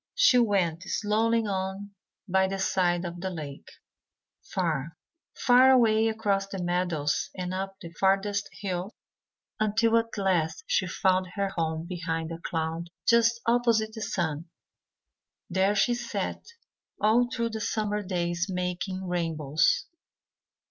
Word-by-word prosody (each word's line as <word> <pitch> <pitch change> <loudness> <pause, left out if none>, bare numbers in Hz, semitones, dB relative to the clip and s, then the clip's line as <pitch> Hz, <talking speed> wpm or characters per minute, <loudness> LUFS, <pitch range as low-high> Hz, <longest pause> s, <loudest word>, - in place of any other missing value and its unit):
She - - +6
went 190 -7 +1
slowly 225 +3 +1
on 195 0 -3 0.4
by 190 0 +3
the 195 +1 -3
side 180 -2 +1
of 175 0 -6
the 190 - -2
lake, 150 -6 -7 0.7
far, 165 -3 -2 0.4
far 250 +1 +6
away 225 -4 +5
across 205 -3 0
the 195 - -6
meadows 175 -4 -1
and 180 0 -4
up 195 +1 -4
the 170 -4 -9
farthest 195 +3 +1
hill, 185 +1 -3 0.6
until 225 +2 +2
at 230 -1 -2
last 180 -1 0
she 185 - +1
found 185 +1 +1
her 200 -1 0
home 160 -2 -2
behind 165 -2 -3
a 165 - -6
cloud 165 0 -3 0.2
just 235 0 +4
opposite 230 -2 +2
the 220 - -7
sun. 165 -6 -2 1.1
There 190 +3 +2
she 225 +4 +3
sat 240 -1 -4 0.5
all 225 +4 +4
through 235 -2 -1
the 220 0 -4
summer 210 -1 -1
days 175 -2 -1
making 180 +1 -3
rainbows. 160 -4 +1
190 Hz, 130 wpm, -27 LUFS, 175-215 Hz, 1.1 s, She